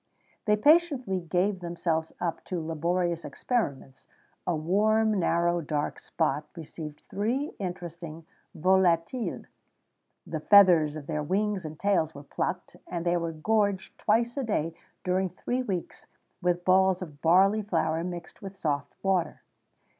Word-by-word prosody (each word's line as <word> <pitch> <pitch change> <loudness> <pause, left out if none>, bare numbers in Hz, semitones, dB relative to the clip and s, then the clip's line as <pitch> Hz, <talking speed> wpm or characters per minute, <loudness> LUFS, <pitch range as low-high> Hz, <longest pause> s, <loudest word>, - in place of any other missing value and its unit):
They 210 -2 +4
patiently 285 - +3
gave 180 +3 0
themselves 170 -2 -2
up 170 -2 -2
to 180 - -3
laborious 170 +2 -1
experiments: 140 - -3 0.4
a 175 - +2
warm, 210 +6 +2
narrow, 175 0 +2
dark 150 -1 -2
spot 150 -2 -1
received 155 -2 -8
these 245 +9 -1
interesting 170 -3 -6 0.3
volatiles; 185 +5 +2 0.8
the - - -4
feathers 175 -7 +6
of 155 -2 -7
their 150 0 -2
wings 195 +3 -1
and 155 0 -7
tails 175 -6 +1
were 140 - -9
plucked, 180 +5 -4
and 170 -1 -4
they 175 0 +2
were 170 -1 -2
gorged 200 +3 0
twice 235 +3 +2
a 275 - 0
day 165 -8 -1 0.3
during 185 +1 +1
three 245 +8 -2
weeks 190 -8 -5 0.3
with 175 0 0
balls 190 0 +4
of 150 -5 -12
barley 195 +6 +5
flour 165 -5 0
mixed 175 -1 -7
with 195 -1 -8
soft 145 -5 -2
water. 190 -3 0
175 Hz, 135 wpm, -28 LUFS, 160-200 Hz, 0.8 s, feathers